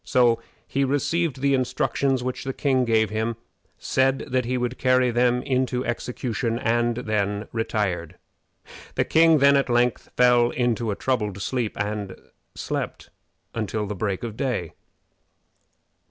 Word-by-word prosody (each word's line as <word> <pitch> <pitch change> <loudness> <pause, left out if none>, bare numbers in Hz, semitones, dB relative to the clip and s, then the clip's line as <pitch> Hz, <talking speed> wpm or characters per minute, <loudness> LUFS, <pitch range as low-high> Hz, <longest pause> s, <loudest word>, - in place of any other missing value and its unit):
So 120 -2 +3 0.3
he 140 - 0
received 145 +1 0
the 140 0 +3
instructions 130 0 0
which 130 0 -3
the 135 - -3
king 130 -3 +1
gave 110 -3 +2
him, 110 +2 -1 0.4
said 135 0 +1
that 130 -1 +1
he 125 +1 -1
would 125 0 -3
carry 130 -1 +3
them 125 +1 +2
into 130 -1 0
execution, 120 -1 -2
and 120 0 +1
then 105 -3 -1
retired. 95 -7 -2 0.8
The - - +2
king 160 0 +5
then 140 0 +5
at 140 -2 +2
length 120 0 +1
fell 125 -1 +5
into 120 -2 0
a 100 - -1
troubled 105 -6 -1
sleep, 120 +1 -2
and 105 -1 -3 0.4
slept - - -4 0.4
until 110 -1 -2
the 105 - -4
break 100 0 -2
of 115 -3 -5
day. 120 - -2
120 Hz, 140 wpm, -24 LUFS, 110-130 Hz, 0.8 s, king